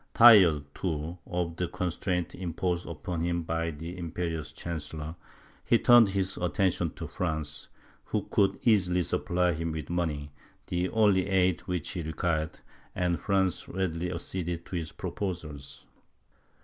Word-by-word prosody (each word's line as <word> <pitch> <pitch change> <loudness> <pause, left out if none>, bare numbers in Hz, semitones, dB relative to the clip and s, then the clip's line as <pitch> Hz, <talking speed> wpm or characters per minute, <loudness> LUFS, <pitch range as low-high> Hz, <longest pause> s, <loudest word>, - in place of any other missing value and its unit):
Tired, 95 -11 +8
too, 85 0 -3
of 85 -1 -2
the 90 - 0
constraint 90 0 -2
imposed 90 0 -2
upon 85 +1 -4
him 85 0 0
by 80 0 -1
the 80 +3 -6
imperious 85 -3 -3
chancellor, 80 -1 -5 0.5
he 120 - +4
turned 120 -3 +7
his 95 -1 -1
attention 90 0 +1
to - - -6
France, 80 -4 -3 0.4
who - - -1
could 100 -1 +3
easily 90 -6 +3
supply 90 +1 +1
him 80 +1 -2
with 80 +1 -5
money, 75 -4 -2 0.3
the 90 +1 -1
only 100 -4 +3
aid 95 -2 +2
which 90 -4 -2
he 90 - -3
required, 80 0 -2 0.3
and 90 -2 0
France 95 -2 0
readily 90 -2 -2
acceded 85 -1 -4
to - - -6
his 80 -3 -3
proposals. 80 -8 -5
85 Hz, 135 wpm, -29 LUFS, 80-90 Hz, 0.5 s, Tired